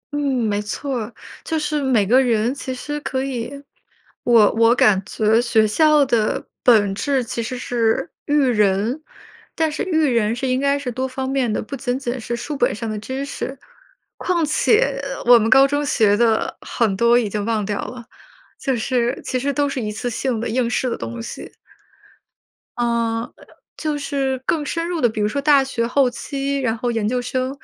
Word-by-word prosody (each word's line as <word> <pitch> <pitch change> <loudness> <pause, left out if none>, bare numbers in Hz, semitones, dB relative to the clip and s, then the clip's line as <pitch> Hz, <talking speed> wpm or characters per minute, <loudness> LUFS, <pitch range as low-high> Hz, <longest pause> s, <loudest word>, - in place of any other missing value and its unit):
嗯， - - 0 0.3
没 205 -1 0
错 260 +6 -4
儿， 225 +1 -6 0.3
就 320 - -2
是 300 -1 -1
每 250 -7 +2
个 250 +7 +5
人 235 -1 +1
其 275 -1 -6
实 295 +4 -5
可 265 -2 -3
以 255 -3 -4 0.7
我 230 -4 +5
我 230 +1 +4
感 205 -6 +4
觉 220 +1 +2
学 225 -2 +3
校 300 +5 +4
的 230 -4 0
本 210 -5 +4
质 270 +5 0
其 235 0 -4
实 240 +3 -4
是 240 0 0 0.2
育 290 - +1
人， 215 +3 +1 0.5
但 320 -2 +1
是 300 - -3
育 320 -4 +1
人 230 -4 +1
是 260 +2 -3
应 255 0 +1
该 280 +1 +2
是 280 -3 -4
多 260 +2 -2
方 260 0 -4
面 265 -3 0
的， - - -2
不 275 - -6
仅 245 -1 -2
仅 255 -1 -4
是 235 - -3
书 290 +5 -5
本 275 - +1
上 230 +2 -5
的 215 -1 -3
知 260 +6 -4
识， 275 -1 -5 0.6
况 345 -3 0
且 425 - +2 0.2
我 240 0 +8
们 225 0 0
高 270 +3 +7
中 290 +1 -1
学 220 -7 +3
的 225 0 +1
很 220 -5 0
多 235 +4 +4
已 240 -3 +1
经 205 0 -3
忘 215 -1 -1
掉 205 0 -2
了， 245 -2 -8 0.5
就 265 -3 -1
是 245 +2 0
其 255 - -1
实 280 +3 -1
都 285 +1 0
是 275 -2 -3
一 210 -1 -3
次 230 +3 -4
性 240 0 -2
的 230 - -3
应 235 +1 0
试 250 +1 -1
的 - - -1
东 115 0 -6
西。 - - -8 1.3
呃， 235 -1 -1 0.5
就 305 -2 -2
是 275 -2 -2
更 310 -3 0
深 335 +3 -3
入 345 -3 -2
地 240 - +4
比 215 - -5
如 210 - +2
说 280 +6 -2
大 285 -1 +5
学 250 -3 -2
后 265 +2 +3
期， 275 +3 -3
然 235 -4 0
后 245 +1 -1
研 225 -3 -1
究 250 +3 0
生， 255 +1 -2
245 Hz, 215 characters per minute, -20 LUFS, 225-275 Hz, 1.3 s, 我